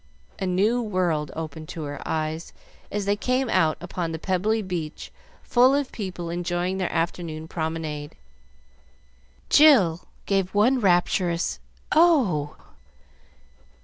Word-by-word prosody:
A 190 - -2
new 205 +7 +2
world 180 -8 -1
opened 160 -1 -6
to 165 - -6
her 145 -1 -6
eyes 160 +1 -3 0.4
as 205 -1 -2
they 200 +1 +2
came 255 +4 0
out 165 -4 +2
upon 175 -1 -4
the 160 - -3
pebbly 195 +6 0
beach 170 -5 -5 0.3
full 255 +3 +4
of 285 -2 -1
people 180 -5 -5
enjoying 175 +2 -2
their 185 - -1
afternoon 165 -1 -3
promenade. 160 -3 -4 1.4
Jill 210 - +5 0.2
save 195 -1 0
one 245 +6 +4
rapturous 175 -3 +1 0.3
"Oh!" 255 - +3
180 Hz, 115 wpm, -24 LUFS, 160-210 Hz, 1.4 s, Jill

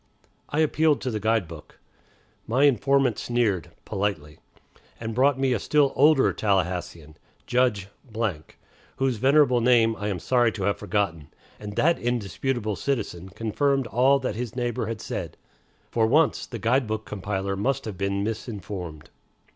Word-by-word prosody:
I 150 - +1
appealed 155 -1 +2
to 130 - -2
the 110 - -2
guide 110 -3 +1
book. 80 -2 -12 0.7
My 130 +5 +2
informant 135 -2 +3
sneered, 110 -8 0 0.2
politely, 85 -7 -3 0.6
and 115 -1 -4
brought 135 +3 +3
me 135 -1 +1
a 115 - 0
still 145 +4 +2
older 145 0 +4
Tallahassean, 90 -6 -2 0.3
Judge, 120 -6 +1 1.1
whose 135 -3 0
venerable 130 0 +4
name 115 -2 +4
I 105 - -4
am 100 -3 -1
sorry 120 +5 +2
to 100 - -5
have 100 +2 +1
forgotten, 90 -7 -2 0.3
and 105 -1 -7
that 170 +2 +3
indisputable 120 -1 -2
citizen 100 -9 -3
confirmed 120 +7 0
all 125 +5 +3
that 130 -2 -3
his 120 -1 -5
neighbor 120 -3 -2
had 115 -1 -5
said. - - -5 0.5
For 110 -1 +2
once, 150 +5 +2
the 120 - -6
guide 115 +3 +1
book 110 0 -3
compiler 100 -1 -3
must 135 +7 -1
have 100 -5 -6
been 100 0 -1
misinformed. 100 -7 -6
115 Hz, 145 wpm, -25 LUFS, 100-130 Hz, 1.1 s, older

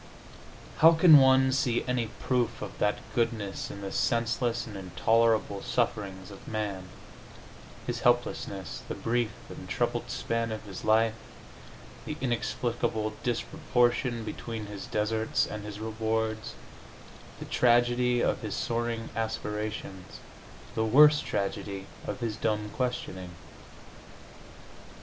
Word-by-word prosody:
How 165 +1 +8
can 160 -2 +8
one 130 0 +5
see 125 -3 +1
any 125 -2 0
proof 120 0 -1
of 100 -2 -7
that 105 0 +2 0.2
goodness 115 -4 -1
in 100 - -8
the 100 -1 -5
senseless 115 0 0
and 110 - -9
intolerable 110 +2 +1
sufferings 100 -5 -2
of 100 - -12
man 105 -4 -3 1.0
his 120 -1 -2
helplessness, 120 -6 0
the - - -4
brief 120 -1 0 0.2
and - - -9
troubled - - -1
span 115 0 -1
of 110 0 -5
his 100 -3 -8
life, 110 +1 +4 0.9
the - - -4
inexplicable 120 -3 -1
disproportion 120 -2 0
between 110 0 -5
his 105 -1 -7
deserts 110 +1 0
and 105 -1 -6
his 105 0 -7
rewards, 110 +1 -2 0.8
the - - -7
tragedy 120 0 +3
of - - +1
his 110 -3 -4
soaring 115 -1 -2
aspiration, 105 -3 -3 0.7
the 110 - 0
worse 150 +6 +7
tragedy 100 -4 -3 0.2
of 125 - -4
his 115 -2 -2
dumb 105 -2 -1
questioning? 95 -8 -3
115 Hz, 115 wpm, -29 LUFS, 105-120 Hz, 1.0 s, How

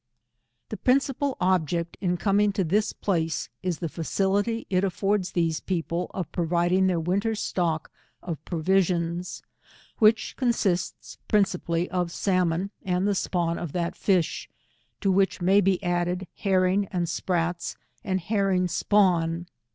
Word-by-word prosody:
The 215 - -5
principal 270 +1 +1
object 170 -2 0
in 180 -2 0
coming 205 +2 +2
to 195 - 0
this 205 +6 +1
place, 165 -5 -1
is 180 -3 -1
the 170 - -3
facility 195 +7 -1
it 185 0 +1
affords 195 0 0
these 165 -2 +1
people 175 -1 -2
of 185 -5 -5
providing 175 +2 +2
their 180 -2 +1
winter 200 +7 0
stock 170 -6 -1 0.3
of 160 -4 -5
provisions, 175 0 0 0.6
which 220 0 +3
consists 205 -8 -1
princi 200 -4 +2
pally 170 +1 0
of 180 -2 -1
salmon, 185 0 0
and 185 +1 0
the 205 - +2
spawn 175 -3 -1
of 170 -5 -5
that 170 -1 -2
fish; 185 -5 0 0.5
to 195 - +2
which 195 +1 +2
may 190 +3 +4
be 195 -1 +3
added 175 +1 0
herrings 190 0 +1
and 175 -2 -1
sprats, 175 0 -1 0.3
and 185 -1 -1
herring 195 -1 +1
spawn. 175 -3 +2
180 Hz, 135 wpm, -26 LUFS, 170-195 Hz, 0.6 s, may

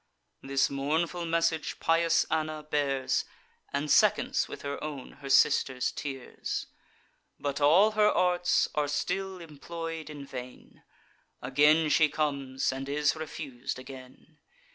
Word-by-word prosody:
This 135 0 +1
mournful 160 +5 -1
message 165 -1 0
pious 165 0 +3
Anna 155 -1 -1
bears, 140 -3 0 0.5
And 145 +2 -1
seconds - - +3
with - - -9
her 140 +1 -4
own 145 -4 -6
her 135 - -7
sister's 130 -2 +3
tears: 135 -3 -5 0.7
But 145 0 -3
all 175 +9 +6
her 215 -1 +4
arts 180 0 +2
are 150 -1 0
still 185 +6 -2
employ'd 165 0 -7
in 145 -2 -8
vain; 125 -2 -10 0.6
Again 150 +5 +4
she 155 -2 +5
comes, 140 -3 -1
and 135 +1 -5
is 145 0 +2
refus'd 145 -6 -6
again. 130 +4 -12
150 Hz, 120 wpm, -29 LUFS, 135-165 Hz, 0.7 s, all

